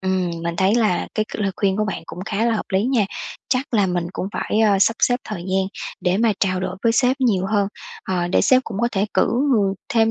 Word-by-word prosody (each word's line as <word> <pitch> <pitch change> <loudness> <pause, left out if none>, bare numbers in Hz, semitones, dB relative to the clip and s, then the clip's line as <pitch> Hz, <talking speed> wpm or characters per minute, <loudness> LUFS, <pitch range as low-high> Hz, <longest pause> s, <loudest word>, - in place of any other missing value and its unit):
Ừm, 185 -2 0
mình 170 0 -3
thấy 190 +4 +3
là 215 -6 +1
cái 215 - +1
c - - -7
lời 200 -1 +1
khuyên 195 -2 +1
của 215 - +1
bạn 210 - -4
cũng - - -9
khá 215 +1 -1
là 230 - +2
hợp 215 - -3
lý 195 +3 +2
nha, 250 -5 +2 0.4
chắc 255 -1 -1
là 205 -3 +3
mình 175 -1 -1
cũng - - -3
phải, 215 - -1
ơ, 205 -3 +4
sắp 225 +4 +3
xếp 245 - +4
thời 210 -5 -5
gian 190 +1 0 0.3
để 180 0 +1
mà 225 -1 +3
trao 185 -2 +1
đổi 185 0 -3
với 230 - +3
sếp 250 +2 +2
nhiều 195 -7 +2
hơn, 205 -2 +1 0.4
ờ, 175 -2 -1
để - - +3
sếp 255 0 +4
cũng 205 -3 -6
có 235 - +2
thể 200 +2 +1
cử - - +4 0.3
người 200 -4 +2
thêm 225 -1 +3
205 Hz, 255 wpm, -21 LUFS, 190-225 Hz, 0.4 s, ơ